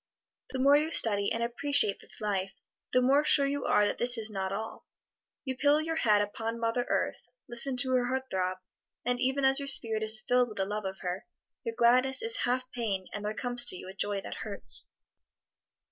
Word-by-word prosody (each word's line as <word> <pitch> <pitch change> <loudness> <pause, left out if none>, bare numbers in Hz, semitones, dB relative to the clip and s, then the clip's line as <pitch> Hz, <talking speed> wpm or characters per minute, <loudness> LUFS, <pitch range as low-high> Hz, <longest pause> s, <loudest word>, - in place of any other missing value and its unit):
The 260 - -5
more 275 +2 +4
you 305 +2 +1
study 205 -9 +2
and 230 - -2
appreciate 250 -2 +1
this - - -11
life, 195 -2 -3 0.4
the 255 - +2
more 275 +3 +3
sure 285 -2 +2
you 280 0 -3
are 210 - +3
that - - -2
this 245 0 +3
is 220 -1 -2
not 190 -2 -3
all. 220 +3 -6 0.6
You 260 -1 -4
pillow 290 +3 +3
your 320 +1 -3
head 210 -7 +3
upon 225 +2 -5
Mother 230 +2 -2
Earth, - - -2 0.3
listen 250 +2 +6
to 260 0 0
her 250 -1 +1
heart 260 +1 -2
throb, 185 0 -2 0.5
and 245 0 -1
even 265 +2 0
as 270 +1 +4
your 280 - -5
spirit 225 -5 +2
is 220 0 +1
filled 250 0 +2
with 215 - -11
the 195 - 0
love 210 +1 -4
of 190 0 -6
her, 185 +5 -5 0.4
your 230 -2 -5
gladness 255 - +3
is 460 +2 +4
half 255 +1 0
pain 205 -6 -4
and 210 - -6
there 210 +1 -4
comes 245 0 0
to 185 - +2
you 185 - -10
a - - -9
joy 200 +1 -1
that - - -7
hurts. - - +3
240 Hz, 210 wpm, -29 LUFS, 210-265 Hz, 0.6 s, listen